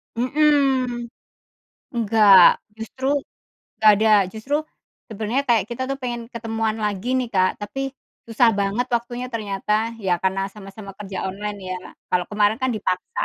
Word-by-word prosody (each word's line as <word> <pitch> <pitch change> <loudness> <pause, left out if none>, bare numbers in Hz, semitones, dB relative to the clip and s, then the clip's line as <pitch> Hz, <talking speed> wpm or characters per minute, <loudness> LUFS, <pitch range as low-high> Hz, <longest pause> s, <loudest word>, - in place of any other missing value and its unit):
Mhm. 260 -2 +2 0.9
Nggak, 215 -3 +6 0.4
justru 225 +4 -7 0.7
nggak 215 - +6
ada, 220 +1 +2 0.2
justru 220 +6 -4 0.6
sebenernya 220 +6 -1
kayak 225 -5 +4
kita 240 +2 -4
tuh 275 - -2
pengen 240 -2 -4
ketemuan 225 -1 -2
lagi 205 +2 -2
nih, 250 -2 -2
Kak, 185 0 +1
tapi 270 +6 -4 0.4
susah 230 +1 +4
banget 200 +5 0
waktunya 240 +1 -3
ternyata, 210 -2 -3 0.3
ya 190 -4 -1
karena 190 +1 0
sama-sama 195 0 -10
kerja 195 -2 -6
online 205 +2 -5
ya. 185 - -3 0.3
Kalau 180 -1 +1
kemarin 210 +1 +2
kan 260 - +2
dipaksa, 185 -4 -2
220 Hz, 135 wpm, -22 LUFS, 200-245 Hz, 0.9 s, Nggak